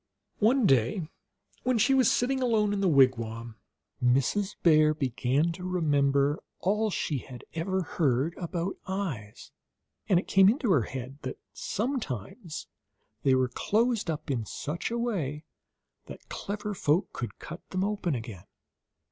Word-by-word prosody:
One 235 +3 +4
day, 135 - +2 0.5
when 255 -1 +1
she 245 +5 +4
was 260 -4 +5
sitting 265 +2 +1
alone 220 -4 +2
in 200 - -1
the 195 - +3
wigwam, 115 -5 +2 0.5
Mrs. 135 +12 +2
Bear 155 -2 +5
began 135 +3 +1
to 180 +2 -8
remember 145 -5 +2 0.2
all 210 +3 +1
she 150 -7 -1
had 125 0 -11
ever 185 +3 -1
heard 145 -1 +1
about 175 +1 -3
eyes, 155 - -4 0.6
and 180 - +5
it - - -7
came 195 0 +6
into 240 -1 +1
her 150 -8 +5
head 130 +1 -6
that - - -5 0.2
sometimes 210 - -4 0.6
they 135 -1 +4
were 130 -1 +2
closed 225 - +1
up 155 -1 -3
in 120 -4 -1
such 150 +9 -4
a 235 - -2
way 160 - -2 0.6
that - - -11
clever 210 +1 -4
folk 170 -1 +1
could 120 - -5
cut 170 +2 -8
them 185 0 -1
open 200 -6 -1
again. 110 -6 -7
165 Hz, 145 wpm, -28 LUFS, 135-205 Hz, 0.6 s, came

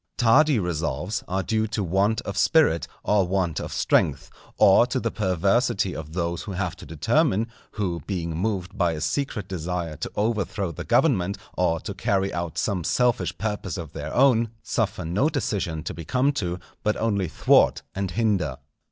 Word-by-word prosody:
Tardy 135 +4 +5
resolves 85 +2 -2
are 95 +1 -1
due 110 +5 0
to 110 -1 -2
want 100 +5 +1
of 100 - -6
spirit 150 - +3 0.2
or 100 -3 +2
want 90 -4 0
of - - -5
strength, - - +1 0.3
or - - +6
to - - -1
the - - -2
perversity 95 +1 +1
of 80 0 -7
those 85 -1 -2
who 100 - -6
have 90 -1 -2
to - - -11
determine, 110 - +1 0.3
who 90 -6 -2
being 85 -5 -3
moved 95 0 -2
by 85 -3 +1
a 80 - -4
secret 105 - -2
desire 90 -3 -3
to - - -5
overthrow 105 -4 -1
the 80 - -7
government, 110 - +2 0.2
or 85 -2 +1
to 100 - -5
carry 100 -1 0
out 85 -1 -4
some 95 -5 -1
selfish 95 -7 +1
purpose 105 0 -3
of 80 -4 -7
their 75 +1 -5
own, 120 -4 +4
suffer 110 -6 -1
no 100 - +1
decision 100 - -2
to - - -4
be 85 - -7
come 130 - +2
to, 90 -10 -2 0.2
but 105 - 0
only 100 -5 0
thwart - - +3
and 100 -1 -2
hinder. 90 - 0
95 Hz, 175 wpm, -25 LUFS, 85-110 Hz, 0.3 s, or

